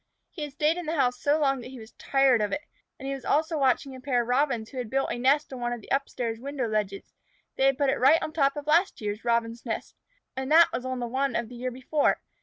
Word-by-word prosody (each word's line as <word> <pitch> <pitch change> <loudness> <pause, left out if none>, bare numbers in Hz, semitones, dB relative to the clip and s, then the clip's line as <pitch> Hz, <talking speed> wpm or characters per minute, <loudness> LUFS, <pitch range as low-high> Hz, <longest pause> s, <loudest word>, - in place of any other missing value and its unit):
He 330 - -9
had 295 -2 -5
stayed 305 +3 +1
in 350 -3 -5
the 320 - -1
house 250 -4 +1
so 290 +2 +2
long 270 -3 +1
that - - -9
he 260 0 -10
was 220 -1 -12
tired 270 -4 +2
of 210 - -1
it, 290 - -2 0.4
and 270 - -7
he 275 - -2
was 270 -2 -7
also 315 +5 +1
watching 270 0 +1
a 260 - -11
pair 250 -3 +1
of - - -10
Robins 250 -4 +1
who 260 - -5
had 240 -3 -4
built 270 +2 0
a 240 - -3
nest 275 +3 +2
on 255 - -6
one 240 0 -1
of 240 - -5
the - - -15
up 275 0 +1
stairs 230 -2 -3
window 270 -1 -3
ledges. 210 -2 -3 0.4
They 265 - +2
had 270 -1 +2
put 285 -2 +2
it - - -2
right 275 +6 +6
on 310 - -5
top 275 -3 +2
of 290 - -5
a - - -5
last 345 +5 +3
year's 210 0 -4
Robins' 235 0 0
nest, 225 -3 -4 0.4
and 265 +2 -4
that 330 +2 +7
was 250 - -3
on 255 -1 -3
one 265 -1 0
of 235 -2 -2
the 245 - -10
year 250 +1 -3
before. 260 +4 0
265 Hz, 280 wpm, -27 LUFS, 240-285 Hz, 0.4 s, that